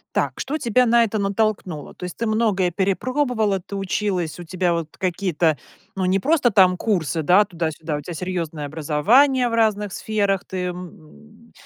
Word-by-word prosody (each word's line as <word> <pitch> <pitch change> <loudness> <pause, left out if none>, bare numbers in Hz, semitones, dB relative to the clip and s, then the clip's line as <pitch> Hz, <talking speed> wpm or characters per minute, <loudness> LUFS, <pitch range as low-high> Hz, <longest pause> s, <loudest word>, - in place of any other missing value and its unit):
Так, - - 0
что 295 +4 -3
тебя 250 -1 +2
на 235 +1 +5
это 220 -1 0
натолкнуло? 200 -5 -1
То - - -10
есть 180 - -6
ты 230 - -2
многое 215 -5 +1
перепробовала, 215 - 0
ты 190 +2 -10
училась, 190 -4 -2
у 175 - -8
тебя 180 +1 0
вот 165 -2 -4
какие-то 175 -4 0 0.4
ну 190 - -1
не 185 +1 +2
просто 280 -4 +2
там 185 -3 +5
курсы, 170 -6 -1
да, 185 +5 +5
туда-сюда, 165 -4 -4
у - - -4
тебя 175 +3 -7
серьезное 165 -4 -4
образование 215 - +3
в 230 - -3
разных 210 -3 +1
сферах, 200 -3 -1
ты, 185 -1 -4
м, 180 0 -4 0.7
м, - - -26
190 Hz, 175 wpm, -22 LUFS, 175-220 Hz, 0.7 s, на